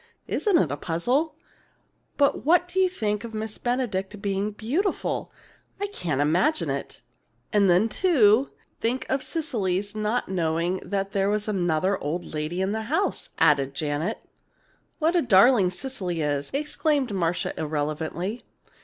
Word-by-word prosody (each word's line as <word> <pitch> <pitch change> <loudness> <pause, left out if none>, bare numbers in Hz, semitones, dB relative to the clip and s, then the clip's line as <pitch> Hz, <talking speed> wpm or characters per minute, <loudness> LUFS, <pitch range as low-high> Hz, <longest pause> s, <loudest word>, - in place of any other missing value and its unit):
Isn't 410 -5 +2
it 155 - +2
a 145 - -2
puzzle? 250 - 0 0.8
But 280 -1 +2
what 350 +4 +4
do 365 +2 -2
you 375 -1 +4
think 210 - -2
of 225 -1 -7
Miss 215 0 -4
Benedict 220 -5 -2
being 200 0 -1
beautiful! 260 - -2 0.5
I 405 - -1
can't 170 - -3
imagine 180 - +2
it!" - - -5 0.5
"And 200 -2 +4
then, 180 +5 +4
too, 255 - +4 0.3
think 255 +3 -1
of 265 - +1
Cecily's 205 - -2
not 215 +3 -1
knowing 170 0 0
there 195 0 0
was 210 0 -1
another 185 -1 +1
old 165 +5 -3
lady 155 +4 -3
in 190 - 0
the 220 +1 -2
house!" 355 +7 0
added 140 -4 +3
Janet. 155 +8 -1 0.8
"What 325 +2 +1
a 350 - +4
darling 210 - +5
Cecily 185 -5 -4
is!" 145 -1 -1
exclaimed 290 -3 0
Marcia, 175 -2 0
irrelevantly. 160 +7 -3
205 Hz, 140 wpm, -25 LUFS, 175-265 Hz, 0.8 s, darling